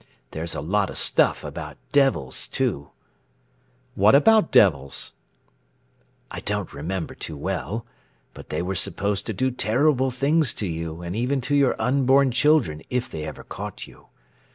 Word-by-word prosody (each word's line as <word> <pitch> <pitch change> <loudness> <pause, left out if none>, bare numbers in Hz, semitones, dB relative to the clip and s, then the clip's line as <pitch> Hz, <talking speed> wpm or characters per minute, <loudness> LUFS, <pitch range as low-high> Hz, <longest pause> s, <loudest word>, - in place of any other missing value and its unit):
There's 80 +1 -3
a - - -3
lot 95 +5 0
of - - -7
stuff - - +2
about - - -7
devils, 135 - +2
too." 70 0 -2 1.0
"What 105 +6 +5
about 215 +5 +5
devils?" 70 -8 +3 1.2
"I - - -5
don't 105 -4 -3
remember 80 +5 -4
too 80 - -7
well, 110 +10 -3 0.5
but - - -12
they - - -2
were 95 +2 -2
supposed 100 +1 -1
to 110 - -2
do 130 +7 0
terrible 130 +3 +2
things 140 +3 +1
to 105 - -3
you 80 -1 -5
and 85 +2 -5
even 125 +5 0
to 145 +4 0
your 140 -3 +3
unborn 135 +3 +3
children 130 - +2
if 125 0 -2
they 75 -1 -5
ever 80 - -8
caught - - -7
you. - - -18
110 Hz, 155 wpm, -24 LUFS, 85-135 Hz, 1.2 s, What